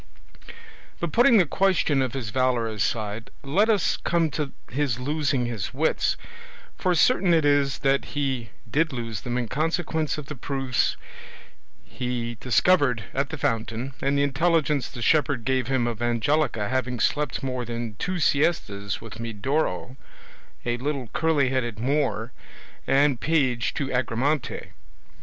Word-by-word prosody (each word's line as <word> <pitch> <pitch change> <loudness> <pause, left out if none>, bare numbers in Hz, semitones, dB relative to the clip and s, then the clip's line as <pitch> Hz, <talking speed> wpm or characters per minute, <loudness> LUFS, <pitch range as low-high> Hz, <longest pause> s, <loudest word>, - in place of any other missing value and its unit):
But 170 -2 -2
putting 240 0 +6
the 185 - +5
question 170 -5 +2
of 130 -3 -1
his 120 -6 -4
valour 130 -2 +1
aside, 110 +1 -2
let 190 +11 +2
us 210 -5 +2
come 165 -2 +1
to 145 -1 -3 0.2
his 135 -2 0
losing 140 -1 0
his 115 -5 -4
wits, - - +1 0.6
for 180 -1 +1
certain 180 - +4
it 160 -2 +2
is 145 -1 +3
that 135 0 +3
he 130 -5 -1 0.2
did 155 +1 +1
lose 115 -5 -4
them 120 0 -2
in 120 -2 -1
consequence 160 +2 -1
of 150 - -6
the 150 - -6
proofs 135 -2 -1 0.9
he 125 -2 -3
discovered 130 - +3
at 135 0 0
the 160 - -5
fountain, 115 +2 -2
and 140 +1 +1
the 140 - +3
intelligence 150 -1 +1
the 120 - -6
shepherd 145 -6 +2
gave 130 -2 +1
him 130 -2 +1
of 120 -1 -3
Angelica 120 -1 +1
having 125 -1 -1
slept 145 +2 0
more 130 -2 -2
than 115 -2 -5
two 185 0 -1
siestas 140 - 0
with 115 -1 -9
Medoro, 115 - -2 0.7
a 120 0 0
little 135 -2 -3
curly 155 -5 +2
headed 120 -4 -1
Moor, 130 -1 0 0.6
and 140 -2 +3
page 130 -7 +1
to 135 -2 -2
Agramante. 130 +3 -1
135 Hz, 145 wpm, -25 LUFS, 120-150 Hz, 0.9 s, putting